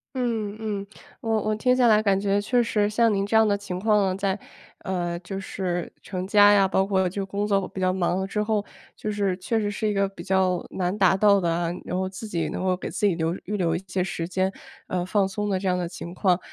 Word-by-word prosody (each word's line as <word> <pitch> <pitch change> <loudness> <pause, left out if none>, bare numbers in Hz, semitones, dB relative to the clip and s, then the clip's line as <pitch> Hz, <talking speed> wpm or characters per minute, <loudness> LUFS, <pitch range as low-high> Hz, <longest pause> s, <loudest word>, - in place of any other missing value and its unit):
嗯 225 -5 -1
嗯， 205 -2 -3 0.3
我 225 -1 +1
我 215 0 0
听 250 +4 +2
下 250 -2 +4
来 215 -1 +5
感 200 -2 +2
觉 200 0 +1
确 245 +3 +2
实 210 -2 +1
像 225 0 +3
您 195 0 +1
这 220 - +3
样 220 - +5
的 205 - +2
情 195 -3 -5
况 210 -1 +3
啊， 185 - -1
在 195 0 -1 0.5
呃， 175 -2 -2
就 190 +2 -6
是 180 -3 -3
成 185 -1 -5
家 205 +1 +6
呀， 195 -1 +5
包 190 0 +2
括 190 -2 +1
就 195 +2 -3
工 200 +2 -2
作 195 -2 +1
比 190 - -8
较 185 0 +3
忙 180 -1 0
了 190 - -1
之 210 +2 -2
后， 210 -1 0 0.3
就 215 - -4
是 200 -3 0
确 220 +4 -1
实 205 - -1
是 210 +1 -2
一 210 - 0
个 195 0 +2
比 195 - -10
较 185 -2 +1
难 185 +1 -1
达 190 -2 +4
到 200 -1 +5
的 170 -1 +1
啊， 170 0 0 0.2
然 180 - -3
后 185 0 -1
自 195 +4 -7
己 170 -3 -1
能 - - -4
够 185 -1 +2
给 - - -5
自 - - -1
己 195 - +4
留 165 +1 -1
预 210 0 -3
留 170 -3 +1
一 190 - -4
些 185 +1 -1
时 175 -2 -3
间， 185 +1 0 0.4
呃， 180 -1 -1
放 195 0 +2
松 205 +1 -3
的 190 -1 0
这 195 - -3
样 180 0 +2
的 175 -1 -2
情 170 0 -8
况。 180 -1 +2
195 Hz, 275 characters per minute, -25 LUFS, 185-210 Hz, 0.5 s, 家